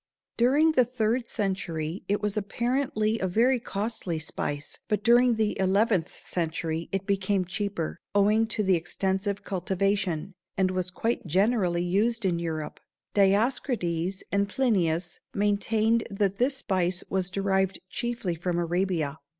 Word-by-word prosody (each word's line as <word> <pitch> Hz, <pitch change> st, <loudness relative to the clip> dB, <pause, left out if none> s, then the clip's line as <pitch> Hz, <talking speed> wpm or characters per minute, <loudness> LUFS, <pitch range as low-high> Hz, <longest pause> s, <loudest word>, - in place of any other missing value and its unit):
During 285 Hz, +7 st, +4 dB
the 260 Hz, -5 st, +4 dB
third 235 Hz, 0 st, -1 dB
century 185 Hz, -6 st, -2 dB
it 205 Hz, +1 st, 0 dB
was 210 Hz, 0 st, 0 dB
apparently 225 Hz, +1 st, 0 dB
a 190 Hz, -, 0 dB
very 240 Hz, +7 st, +3 dB
costly 205 Hz, -6 st, -3 dB
spice, 145 Hz, -1 st, -4 dB
but 210 Hz, -2 st, -1 dB
during 240 Hz, +1 st, +5 dB
the 215 Hz, -1 st, 0 dB
eleventh 190 Hz, -2 st, +2 dB
century 165 Hz, -1 st, -3 dB
it 195 Hz, 0 st, -2 dB
became 195 Hz, -1 st, +1 dB
cheaper, 180 Hz, -2 st, -3 dB, 0.2 s
owing 210 Hz, +3 st, +4 dB
to 215 Hz, -2 st, 0 dB
extensive 190 Hz, +3 st, -1 dB
cultivation, 190 Hz, -2 st, -1 dB, 0.2 s
and 190 Hz, -1 st, +2 dB
was 185 Hz, -1 st, -1 dB
quite 225 Hz, +2 st, -2 dB
generally 185 Hz, -1 st, +2 dB
used 210 Hz, +5 st, +1 dB
in 175 Hz, -3 st, +1 dB
Europe. 160 Hz, -2 st, -4 dB, 0.3 s
Dioscrides 195 Hz, -, +1 dB
and 200 Hz, 0 st, +1 dB
Plinius 185 Hz, -, 0 dB, 0.2 s
maintained 215 Hz, +3 st, +2 dB
that 200 Hz, -1 st, 0 dB
this 270 Hz, +3 st, +2 dB
spice 185 Hz, -7 st, 0 dB
was 190 Hz, -1 st, 0 dB
derived 190 Hz, 0 st, 0 dB
chiefly 235 Hz, -4 st, -2 dB
from 175 Hz, +1 st, -2 dB
Arabia. 170 Hz, -3 st, -1 dB
195 Hz, 130 wpm, -27 LUFS, 180-220 Hz, 0.3 s, during